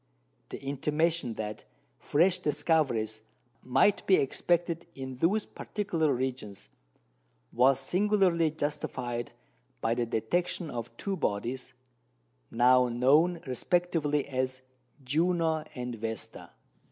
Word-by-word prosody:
The -, -, -6 dB
intimation 150 Hz, 0 st, 0 dB
that 105 Hz, -1 st, -5 dB, 0.4 s
fresh 175 Hz, +5 st, +2 dB
discoveries 145 Hz, -9 st, +1 dB, 0.4 s
might 190 Hz, +11 st, +3 dB
be 190 Hz, -, +7 dB
expected 170 Hz, +3 st, 0 dB
in 130 Hz, -1 st, -6 dB
those 195 Hz, +10 st, +1 dB
particular 170 Hz, -8 st, -2 dB
regions 125 Hz, -6 st, -4 dB, 0.8 s
was 130 Hz, +2 st, +4 dB
singularly 180 Hz, +1 st, +2 dB
justified 145 Hz, -6 st, -3 dB, 0.5 s
by 115 Hz, -, +1 dB
the 120 Hz, 0 st, -1 dB
detection 160 Hz, +8 st, -1 dB
of 120 Hz, -1 st, -5 dB
two 200 Hz, -1 st, -2 dB
bodies 125 Hz, -, -3 dB, 0.8 s
now 125 Hz, +1 st, +4 dB
known 145 Hz, +9 st, +3 dB
respectively 150 Hz, +2 st, 0 dB
as 130 Hz, -1 st, -2 dB, 0.4 s
Juno 160 Hz, +2 st, +1 dB
and 125 Hz, -1 st, -4 dB
Vesta. 110 Hz, -1 st, -6 dB
145 Hz, 100 wpm, -29 LUFS, 125-170 Hz, 0.8 s, be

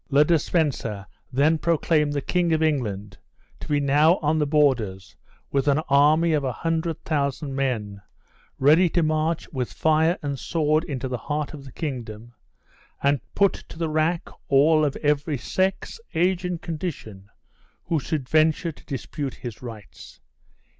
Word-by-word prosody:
Le 145 Hz, +1 st, +5 dB
de 165 Hz, 0 st, +3 dB
Spencer 130 Hz, -, -1 dB, 0.3 s
then 150 Hz, +5 st, +3 dB
proclaimed 155 Hz, -2 st, +1 dB
the 145 Hz, -1 st, -1 dB
King 175 Hz, +2 st, +1 dB
of 160 Hz, 0 st, +2 dB
England 105 Hz, -10 st, -2 dB, 0.4 s
to -, -, -9 dB
be 145 Hz, -2 st, +1 dB
now 145 Hz, +4 st, +4 dB
on 155 Hz, +1 st, 0 dB
the 150 Hz, -, +1 dB
borders 120 Hz, -, +1 dB, 0.4 s
with 140 Hz, 0 st, 0 dB
an 140 Hz, 0 st, +4 dB
army 155 Hz, +4 st, +4 dB
of 150 Hz, -2 st, +1 dB
a 130 Hz, -, -1 dB
hundred 165 Hz, +4 st, -2 dB
thousand 140 Hz, -2 st, -2 dB
men, 110 Hz, -7 st, -2 dB, 0.6 s
ready 155 Hz, +6 st, +5 dB
to 170 Hz, +1 st, +1 dB
march 155 Hz, +1 st, 0 dB
with 125 Hz, -3 st, -3 dB
fire 160 Hz, +2 st, +2 dB
and 140 Hz, -2 st, -3 dB
sword 155 Hz, -1 st, +1 dB
into 135 Hz, -5 st, -4 dB
the 125 Hz, -2 st, -4 dB
heart 150 Hz, +3 st, -3 dB
of 140 Hz, -2 st, -9 dB
the 135 Hz, -, -10 dB
kingdom, 120 Hz, -6 st, -6 dB, 0.7 s
and 140 Hz, -2 st, +2 dB
put 200 Hz, -1 st, +4 dB
to -, -, -12 dB
the 165 Hz, -1 st, -1 dB
rack 155 Hz, +2 st, 0 dB, 0.2 s
all 155 Hz, +3 st, +4 dB
of 145 Hz, -2 st, 0 dB
every 145 Hz, 0 st, +1 dB
sex, 190 Hz, -, -2 dB, 0.2 s
age, 180 Hz, +2 st, +2 dB
and 180 Hz, -2 st, -4 dB
condition, 140 Hz, -, -6 dB, 0.5 s
who 165 Hz, -, 0 dB
should 140 Hz, -1 st, -3 dB
venture 160 Hz, +3 st, +2 dB
to -, -, -18 dB
dispute 140 Hz, 0 st, -5 dB
his 120 Hz, -4 st, -8 dB
rights. 115 Hz, -5 st, -11 dB
150 Hz, 160 wpm, -24 LUFS, 135-160 Hz, 0.7 s, Le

